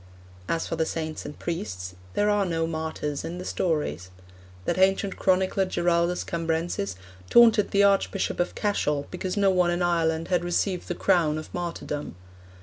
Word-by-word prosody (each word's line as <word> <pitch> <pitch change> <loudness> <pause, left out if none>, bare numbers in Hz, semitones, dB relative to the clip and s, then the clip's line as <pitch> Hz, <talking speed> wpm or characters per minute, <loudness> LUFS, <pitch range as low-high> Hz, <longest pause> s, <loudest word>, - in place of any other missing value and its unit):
As 165 - 0
for - - -3
the 160 - +1
saints 160 -1 -4
and 145 - -9
priests, 95 - -4 0.2
'there 205 - +2
are 205 -1 +2
no 165 -3 0
martyrs 160 -3 -3
in 175 - -5
the 180 - -6
stories.' 120 - -1 0.6
That - - 0
ancient 195 +1 +2
chronicler 190 +1 +2
Giraldus 175 -1 +1
Cambrensis 165 - -2 0.3
'taunted 225 -3 +6
the 200 0 +3
Archbishop 200 -1 +1
of 175 - 0
Cashel, 150 -9 0
because 180 +2 -3
no 200 -1 +4
one 180 -1 +3
in 175 +1 0
Ireland 165 -2 +1
had 180 -1 +2
received 175 +1 -1
the 175 - -3
crown 170 -6 +2
of 155 - -8
martyrdom. 170 - -4
175 Hz, 160 wpm, -26 LUFS, 160-190 Hz, 0.6 s, taunted